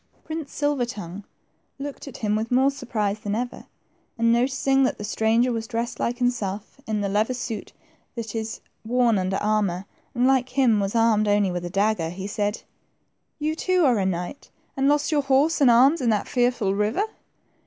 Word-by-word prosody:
Prince 315 -3 -6
Silver 290 -4 0
tongue 200 -3 -7 0.5
looked 285 0 -7
at 275 - -8
him 210 0 +2
with 220 +1 -2
more 265 +2 +3
surprise 215 -6 -2
than 205 0 -3
ever, 245 +2 -4 0.5
and 230 0 +3
noticing 270 +2 +2
that 260 - +1
the - - -7
stranger 225 +3 +2
was 225 -1 -3
dressed 235 0 -3
like 240 +1 -1
himself 235 -1 -2
in 215 -1 -1
the 200 - 0
leather 215 +5 +1
suit 235 -4 -5 0.4
that 225 -3 -5
is 225 -1 -4 0.2
worn 235 -2 +2
under 185 +1 -1
armor, 205 -4 0 0.3
and 245 +1 +2
like 260 -1 +3
him 240 -6 +4
was 200 +2 -2
armed 225 -2 +3
only 205 -2 +2
with 175 -1 -3
a - - -4
dagger, 195 -3 +1
he 190 +3 -6
said, 205 +1 -2 0.7
You 310 0 -1
too 365 0 +2
are 245 -5 +3
a 190 - 0
knight, 180 +8 -4 0.3
and 270 0 +1
lost 295 +2 +2
your 295 -2 +3
horse 275 +4 +2
and 270 - +7
arms 270 +7 +5
in 240 - +2
that 210 -2 +1
fearful 245 -6 +1
river 210 - +1
230 Hz, 185 wpm, -24 LUFS, 205-260 Hz, 0.7 s, and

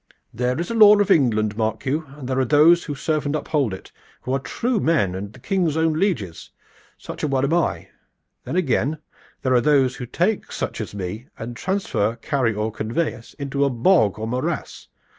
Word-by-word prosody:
"There 125 +3 -1
is 170 +5 -3
a - - -1
law 210 -2 +8
of 205 - +2
England, 110 -7 +3
mark 110 0 -2
you, 150 +4 -1
and 135 -4 -7
there 130 0 0
are - - +3
those 155 +6 +5
who 145 - -4
serve 155 +1 -1
and 145 - -1
uphold 150 -6 0
it, 95 - -9 0.3
who 130 - -2
are 135 - +1
the - - -18
true 240 -2 0
men 150 - +1
and 100 +2 -6
the - - -15
King's 175 -6 0
own 160 0 +2
lieges. 155 - -2 0.5
Such - - -8
a - - 0
one 135 -2 0
am 145 - 0
I. 170 -2 0 0.5
Then - - -5
again, 155 -3 +1 0.5
there 130 -1 +2
are 125 - +4
those 135 -3 +3
who 125 -3 -6
take 185 - -1
such - - -4
as - - -7
me 100 +5 -5
and 120 +1 -6
transfer, 180 - -1
carry 125 0 0
or 105 +1 -2
convey 115 +10 -2
us 115 - -14
into 140 -1 -2
a 140 - +3
bog 120 - +3
or 110 +1 -4
morass. 125 +3 -3
135 Hz, 210 wpm, -22 LUFS, 115-160 Hz, 0.5 s, law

